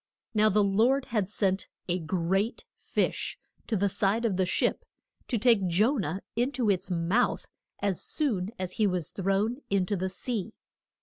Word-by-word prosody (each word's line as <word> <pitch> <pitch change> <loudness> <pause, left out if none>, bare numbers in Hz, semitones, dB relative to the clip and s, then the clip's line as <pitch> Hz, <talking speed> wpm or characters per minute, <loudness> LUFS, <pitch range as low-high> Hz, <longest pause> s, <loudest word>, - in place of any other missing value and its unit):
Now 215 0 +4
the 210 +1 +3
Lord 235 +7 +3
had 210 -5 -1
sent 195 -2 0 0.2
a 180 0 0
great 185 +6 -1
fish - - -2 0.3
to 220 - 0
the 200 +2 +2
side 205 +4 +1
of 210 -5 +1
the 185 0 +1
ship - - +1 0.4
to 240 - 0
take 220 -4 +4
Jo 215 +11 +3
nah 190 -2 -2
in 245 +4 +1
to 235 -7 +2
its 185 -1 -1
mouth 180 +7 +1 0.4
as 195 -3 0
soon 215 - 0
as 185 -2 -3
he 210 - +5
was 180 -5 -1
thrown 195 +5 0
in 195 -2 +2
to 205 - -1
the 190 0 -1
sea. 220 +1 -3
200 Hz, 175 wpm, -28 LUFS, 185-225 Hz, 0.4 s, he